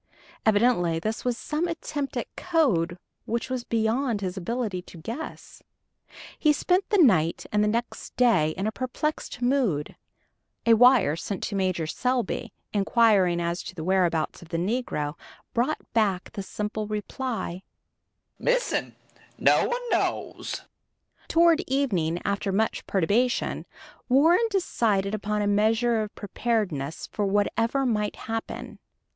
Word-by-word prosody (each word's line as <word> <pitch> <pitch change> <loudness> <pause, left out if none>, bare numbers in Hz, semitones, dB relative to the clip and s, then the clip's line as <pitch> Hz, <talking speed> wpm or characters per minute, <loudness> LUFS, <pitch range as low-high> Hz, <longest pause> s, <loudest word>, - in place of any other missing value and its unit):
Evidently 205 -6 +3
this 215 +7 -3
was 245 -2 0
some 305 +7 -2
attempt 295 -4 -4
at - - -5
code 220 - +1 0.3
which 235 +2 -2
was 255 -2 -2
beyond 230 +1 0
his 185 -1 -3
ability 205 0 -2
to 180 - -14
guess. 230 - -7 0.8
He 305 - +5
spent 360 +5 +1
the 415 - +3
night 185 - +4
and 210 0 +3
the - - +2
next 235 +3 -3
day 225 -11 +4
in 190 - -2
a 215 - 0
perplexed 255 +3 -3
mood. 245 - +1 0.7
A 230 - +6
wire 245 - +6
sent 185 +3 -4
to 205 - -3
Major 185 -4 0
Selby, 250 +8 -1 0.2
inquiring 200 -4 +3
as 170 +1 -1
to 190 - -9
the 160 - -5
whereabouts 175 -3 +1
of 170 - -13
the 170 - -2
negro, 175 -6 -1 0.4
brought 250 +6 +1 0.2
back 200 -5 +1
the 200 - -5
simple 210 +2 -4
reply, 215 -3 -4 0.8
"Missing - - 0 0.4
no - - +4
one 485 0 -3
knows." - - -1 0.6
Toward 335 -1 +4
evening, 190 - 0
after 200 0 -1
much 220 +3 0
perturbation, 210 +7 +1 0.4
Warren 325 - +5
decided 215 - 0
upon 210 0 -1
a - - 0
measure 220 +3 +2
of 210 -1 -6
preparedness 195 - -2
for 205 -1 -2
whatever 225 +6 +1
might 210 -4 0
happen. 225 0 -5
220 Hz, 135 wpm, -26 LUFS, 190-250 Hz, 0.8 s, A